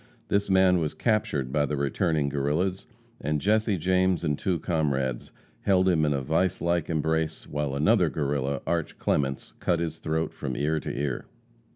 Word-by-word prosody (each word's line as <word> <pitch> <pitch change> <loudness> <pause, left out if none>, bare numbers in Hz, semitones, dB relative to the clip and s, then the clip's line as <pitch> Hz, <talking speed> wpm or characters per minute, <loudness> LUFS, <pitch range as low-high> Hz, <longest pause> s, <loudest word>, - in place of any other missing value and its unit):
This 100 0 +1
man 95 -1 +5
was 75 -2 -2
captured 80 - 0
by 75 0 +1
the 75 - -2
returning 75 +2 0
Guerrillas, 75 +7 -1 0.3
and 75 +1 -1
Jesse 105 +2 +2
James 90 +1 +2
and 75 -3 +1
two 90 +4 -1
comrades 70 -7 -1 0.3
held 95 -1 +3
him 80 -4 +3
in 75 - +1
a 70 -1 -2
vice 90 +5 +1
like 85 -1 0
embrace, 80 0 -1
while 75 -2 -2
another 70 +2 +3
Guerrilla, 70 -2 -1
Arch. 85 -2 -2
Clements, 70 -2 -1
cut 85 -2 +1
his 80 -1 -3
throat 80 +1 -1
from 65 -2 -4
ear 80 +3 +1
to - - -5
ear. 70 -2 -3
80 Hz, 170 wpm, -27 LUFS, 70-90 Hz, 0.3 s, man